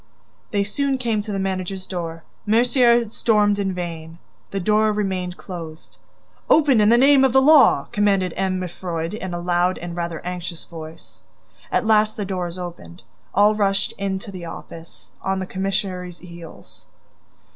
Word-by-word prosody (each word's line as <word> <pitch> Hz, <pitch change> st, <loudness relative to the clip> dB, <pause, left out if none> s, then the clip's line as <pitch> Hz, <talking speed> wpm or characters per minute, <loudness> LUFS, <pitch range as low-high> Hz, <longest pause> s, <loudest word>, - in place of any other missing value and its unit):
They 200 Hz, -1 st, +1 dB
soon 270 Hz, +6 st, -1 dB
came 230 Hz, -4 st, -1 dB
to 210 Hz, +1 st, -6 dB
the 200 Hz, -, -2 dB
managers' 190 Hz, 0 st, -3 dB
door. 165 Hz, -3 st, -5 dB, 0.2 s
Mercier 235 Hz, +1 st, +4 dB
stormed 210 Hz, -3 st, +2 dB
in 195 Hz, -1 st, 0 dB
vain: 165 Hz, -2 st, -6 dB, 0.3 s
the 195 Hz, -, -3 dB
door 215 Hz, +3 st, +2 dB
remained 190 Hz, -4 st, -2 dB
closed. 165 Hz, -3 st, -9 dB, 0.5 s
"Open 285 Hz, -8 st, +5 dB
in 210 Hz, -, +5 dB
the 235 Hz, -, +6 dB
name 270 Hz, +1 st, +6 dB
of 265 Hz, -2 st, +3 dB
the 265 Hz, -, +7 dB
law!" 295 Hz, +1 st, +6 dB
commanded 200 Hz, -5 st, +1 dB
M. 190 Hz, -1 st, 0 dB
Mifroid, 175 Hz, -2 st, -4 dB
in 190 Hz, -4 st, -5 dB
a 175 Hz, -, -3 dB
loud 175 Hz, +1 st, +1 dB
and 175 Hz, 0 st, -7 dB
rather 170 Hz, -2 st, -3 dB
anxious 180 Hz, -1 st, -6 dB
voice. 160 Hz, -1 st, -11 dB, 0.5 s
At 245 Hz, -, +1 dB
last 215 Hz, -1 st, +3 dB
the 205 Hz, -, -2 dB
door 185 Hz, -2 st, -3 dB
was 170 Hz, +1 st, -8 dB
opened. 175 Hz, 0 st, -9 dB, 0.3 s
All 210 Hz, +1 st, +5 dB
rushed 200 Hz, -2 st, 0 dB
in 195 Hz, -1 st, -1 dB
to 200 Hz, +1 st, -9 dB
the 185 Hz, -2 st, -8 dB
office, 165 Hz, 0 st, -11 dB
on 190 Hz, 0 st, -1 dB
the 190 Hz, -, -3 dB
commissary's 185 Hz, -2 st, -3 dB
heels. 170 Hz, -2 st, -12 dB
190 Hz, 165 wpm, -22 LUFS, 175-210 Hz, 0.5 s, the